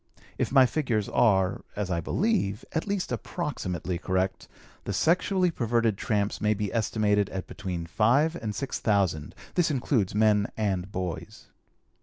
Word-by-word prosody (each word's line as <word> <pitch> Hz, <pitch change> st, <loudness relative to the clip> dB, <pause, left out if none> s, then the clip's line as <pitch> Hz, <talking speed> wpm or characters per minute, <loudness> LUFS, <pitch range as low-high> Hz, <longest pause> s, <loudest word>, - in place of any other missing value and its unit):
If -, -, 0 dB
my 135 Hz, -1 st, +7 dB
figures 120 Hz, -6 st, 0 dB
are, 95 Hz, -5 st, +2 dB
as 100 Hz, -2 st, -2 dB
I 85 Hz, -2 st, 0 dB
believe, 135 Hz, -, 0 dB
at 160 Hz, -, -2 dB
least 200 Hz, -2 st, -2 dB
approximately 90 Hz, -, -3 dB
correct, 95 Hz, +1 st, -1 dB, 0.4 s
the 100 Hz, -, -2 dB
sexually 180 Hz, -, +2 dB
perverted 115 Hz, -5 st, +1 dB
tramps 105 Hz, 0 st, -1 dB
may 105 Hz, 0 st, +2 dB
be 105 Hz, -1 st, -3 dB
estimated 105 Hz, -3 st, +1 dB
at 95 Hz, -1 st, -5 dB
between 90 Hz, -5 st, -5 dB
five 125 Hz, -, +2 dB
and 110 Hz, -10 st, -4 dB
six 140 Hz, -, -3 dB
thousand; 95 Hz, -9 st, 0 dB, 0.2 s
this 175 Hz, -2 st, +2 dB
includes 125 Hz, -8 st, 0 dB
men 105 Hz, -1 st, +4 dB
and 100 Hz, -3 st, -1 dB
boys. 90 Hz, -4 st, -5 dB
105 Hz, 145 wpm, -27 LUFS, 95-130 Hz, 0.4 s, my